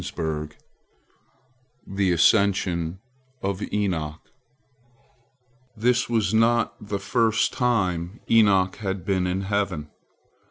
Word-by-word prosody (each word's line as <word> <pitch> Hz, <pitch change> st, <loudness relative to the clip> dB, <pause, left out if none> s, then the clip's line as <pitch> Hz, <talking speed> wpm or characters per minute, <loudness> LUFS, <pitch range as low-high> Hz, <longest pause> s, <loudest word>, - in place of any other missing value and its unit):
THE 95 Hz, -1 st, 0 dB
ASCENSION 90 Hz, -2 st, +2 dB, 0.5 s
OF 100 Hz, 0 st, -2 dB
ENOCH 85 Hz, -7 st, -2 dB, 1.6 s
This 120 Hz, +3 st, +1 dB
was 110 Hz, -4 st, +1 dB
not 115 Hz, +1 st, +3 dB
the 100 Hz, -, -2 dB
first 110 Hz, +2 st, +1 dB
time 95 Hz, -6 st, 0 dB
Enoch 100 Hz, -5 st, +4 dB
had 95 Hz, -4 st, -4 dB
been 95 Hz, -2 st, 0 dB
in 90 Hz, +2 st, -1 dB
heaven. 95 Hz, -7 st, -2 dB
100 Hz, 85 wpm, -24 LUFS, 90-110 Hz, 1.6 s, Enoch